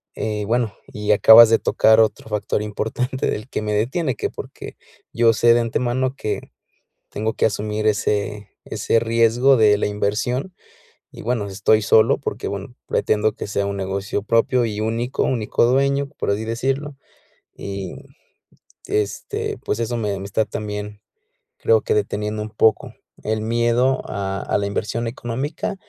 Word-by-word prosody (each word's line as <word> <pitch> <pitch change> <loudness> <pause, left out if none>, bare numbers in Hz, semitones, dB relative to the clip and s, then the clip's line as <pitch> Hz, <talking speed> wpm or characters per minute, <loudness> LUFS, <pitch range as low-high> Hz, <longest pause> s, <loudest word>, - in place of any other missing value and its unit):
Eh, 105 -1 -3
bueno, 115 -1 0
y 105 0 -2
acabas 110 +2 +9
de 115 - +4
tocar 110 0 +4
otro 110 0 +1
factor 105 -1 -1
importante 110 +5 -2
del 110 +5 -4
que - - -3
me 105 0 -2
detiene, 130 +6 0
que - - -2
porque - - -9 0.4
yo 115 -1 +4
sé 115 +2 +4
de 120 - +3
antemano 125 +3 -1
que 110 -6 -4 0.6
tengo 110 +2 -2
que - - +2
asumir 105 0 -2
ese 105 -1 -1
ese - - 0
riesgo 115 +3 +3
de 105 -3 +4
la - - 0
inversión, 110 - -2 0.6
y - - -10
bueno, 115 -3 -1
estoy 105 +3 +2
solo 110 +2 +4
porque, - - -4
bueno, - - -6
pretendo 105 0 +1
que - - -6
sea 100 0 -1
un 100 0 -3
negocio 95 +1 -3
propio 115 +3 +2
y 105 -1 -4
único, 115 +4 -1
único 115 -2 +1
dueño, 140 +2 +1
por - - -1
así 105 +2 -2
decirlo, 135 +5 -2 0.6
y, 100 -2 -6 0.9
este, 105 -1 -2
pues 105 - -3
eso 115 +1 -1
me 105 -3 -2
me - - -6
está 100 +2 0
también, 105 0 -6 0.6
creo 460 0 +3
que 450 - -1
deteniendo 105 - -2
un 110 - -7
poco, 110 +1 +1 0.3
el 110 0 -1
miedo 120 +3 +1
a 100 -1 -3
a - - 0
la 100 - -1
inversión 110 +3 -2
económica 130 - -4
110 Hz, 160 wpm, -21 LUFS, 105-120 Hz, 0.9 s, acabas